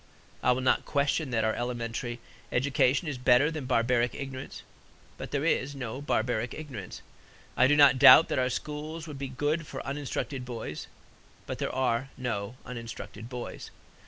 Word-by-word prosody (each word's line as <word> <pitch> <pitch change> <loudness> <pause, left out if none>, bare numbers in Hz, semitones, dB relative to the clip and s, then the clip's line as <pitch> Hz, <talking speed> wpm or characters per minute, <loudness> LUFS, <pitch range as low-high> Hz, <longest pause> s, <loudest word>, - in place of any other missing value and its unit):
I 125 - +4
will 130 - -2
not 130 - +2
question 140 +1 +1
that 115 -3 0
our 110 0 +2
elementary 120 0 -3 0.3
education 135 +4 +2
is 140 -4 -3
better 125 +4 +4
than 155 -5 -5
barbaric 120 -1 +2
ignorance. 135 -1 -7 0.6
But - - -6
there 145 +1 -1
is 140 -3 +1
no 130 0 -5
barbaric 120 -4 -1
ignorance. 130 -12 -8 0.5
I 130 - +5
do 150 - +4
not 140 -3 +6
doubt 165 - +10
that - - 0
our 125 0 +2
schools 155 +4 -5
would 145 -3 -8
be 135 - -3
good 150 +5 -1
for - - -7
uninstructed 140 -1 -3
boys. 115 -11 -6 0.6
But - - -5
there - - -1
are 130 0 0
no 115 -3 -3
uninstructed 115 -3 -8
boys. 125 -1 -7
130 Hz, 160 wpm, -29 LUFS, 120-145 Hz, 0.6 s, doubt